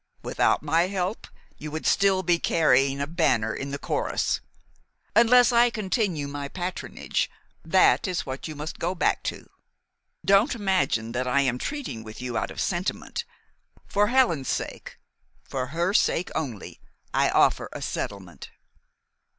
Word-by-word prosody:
Without -, -, +1 dB
my 165 Hz, +2 st, +2 dB
help 190 Hz, +2 st, -3 dB, 0.3 s
you 155 Hz, -, -6 dB
would 155 Hz, +1 st, -5 dB
still 195 Hz, -1 st, +3 dB
be 175 Hz, -1 st, +2 dB
carrying 135 Hz, -5 st, +3 dB
a 140 Hz, -, 0 dB
banner 115 Hz, -8 st, +1 dB
in 135 Hz, +4 st, -5 dB
the 140 Hz, -, -3 dB
chorus. -, -, -1 dB, 0.7 s
Unless 245 Hz, +2 st, +6 dB
I 240 Hz, 0 st, +5 dB
continue 195 Hz, -, -1 dB
my 140 Hz, 0 st, -5 dB
patronage, 180 Hz, +4 st, -3 dB, 0.3 s
that 230 Hz, -, +4 dB
is 180 Hz, -2 st, -2 dB
what 130 Hz, +3 st, -5 dB
you 155 Hz, -, -7 dB
must 150 Hz, +2 st, -6 dB
go 175 Hz, +3 st, -1 dB
back 175 Hz, -, +1 dB
to. -, -, -4 dB, 0.8 s
Don't 200 Hz, +7 st, +4 dB
imagine 185 Hz, -, 0 dB
that 125 Hz, +1 st, -2 dB
I 140 Hz, +3 st, +3 dB
am 125 Hz, -2 st, 0 dB
treating 280 Hz, -, -4 dB
with 110 Hz, -1 st, -10 dB
you 125 Hz, -1 st, -4 dB
out -, -, -1 dB
of -, -, -8 dB
sentiment. 180 Hz, 0 st, -2 dB, 0.6 s
For 205 Hz, +1 st, +2 dB
Helen's 235 Hz, -, +2 dB
sake, -, -, -4 dB, 0.5 s
for 130 Hz, -1 st, -4 dB
her 170 Hz, +6 st, -1 dB
sake 180 Hz, -5 st, +2 dB
only, 125 Hz, -10 st, -5 dB, 0.3 s
I -, -, +3 dB
offer -, -, +3 dB
a -, -, -6 dB
settlement." 95 Hz, -4 st, -5 dB
165 Hz, 150 wpm, -26 LUFS, 135-195 Hz, 0.8 s, Unless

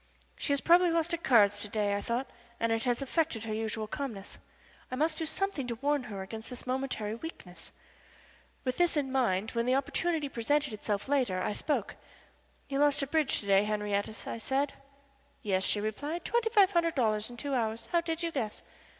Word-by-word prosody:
She -, -, -1 dB
has 280 Hz, -1 st, +3 dB
probably 350 Hz, +1 st, +6 dB
lost 330 Hz, 0 st, +1 dB
at 335 Hz, -, -1 dB
cards 205 Hz, -7 st, +5 dB
to 205 Hz, -, -1 dB
day, 205 Hz, -1 st, 0 dB
I 200 Hz, -, -1 dB
thought, 240 Hz, +5 st, -1 dB, 0.3 s
and 230 Hz, 0 st, +1 dB
it 225 Hz, +1 st, 0 dB
has 245 Hz, +2 st, +1 dB
affected 285 Hz, -5 st, 0 dB
her 220 Hz, -1 st, -3 dB
usual 220 Hz, 0 st, -2 dB
calmness. 215 Hz, -4 st, -6 dB, 0.5 s
I 255 Hz, -, -3 dB
must 310 Hz, +4 st, +1 dB
do 320 Hz, -, -1 dB
something 320 Hz, -5 st, -2 dB
to 235 Hz, -, -2 dB
warn 280 Hz, +2 st, 0 dB
her 195 Hz, -2 st, -5 dB
against 220 Hz, +3 st, -7 dB
this 250 Hz, -1 st, -7 dB
momentary 255 Hz, -5 st, -2 dB
weakness. 225 Hz, -, -8 dB, 0.9 s
With 255 Hz, -1 st, -1 dB
this 350 Hz, -1 st, +4 dB
idea 295 Hz, -, +3 dB
in 265 Hz, -, -7 dB
mind, 220 Hz, -6 st, +1 dB
when 235 Hz, 0 st, -1 dB
the 255 Hz, -, +4 dB
opportunity 290 Hz, +3 st, 0 dB
presented 275 Hz, +1 st, 0 dB
itself 205 Hz, 0 st, -2 dB
later 255 Hz, -10 st, +1 dB
I 185 Hz, -, -1 dB
spoke. 295 Hz, +7 st, -2 dB, 0.7 s
"You 275 Hz, 0 st, -1 dB
lost 290 Hz, -1 st, +4 dB
at 275 Hz, -, -5 dB
bridge 315 Hz, -4 st, +2 dB
to -, -, -9 dB
day, 195 Hz, 0 st, +5 dB
Henriette," 210 Hz, 0 st, -2 dB
I -, -, -4 dB
said. 275 Hz, +4 st, 0 dB, 0.7 s
"Yes," 190 Hz, -2 st, +1 dB
she 205 Hz, -, +1 dB
replied. 290 Hz, +11 st, -3 dB
"Twenty 470 Hz, -1 st, +1 dB
five 405 Hz, -4 st, +5 dB
hundred 335 Hz, -3 st, +2 dB
dollars 215 Hz, -4 st, +1 dB
in 240 Hz, -, -10 dB
two 280 Hz, +2 st, -3 dB
hours. 225 Hz, -2 st, -1 dB
How 340 Hz, -1 st, +3 dB
did 335 Hz, 0 st, -2 dB
you 335 Hz, -, -1 dB
guess?" 225 Hz, -8 st, -3 dB
255 Hz, 200 wpm, -31 LUFS, 215-295 Hz, 0.9 s, probably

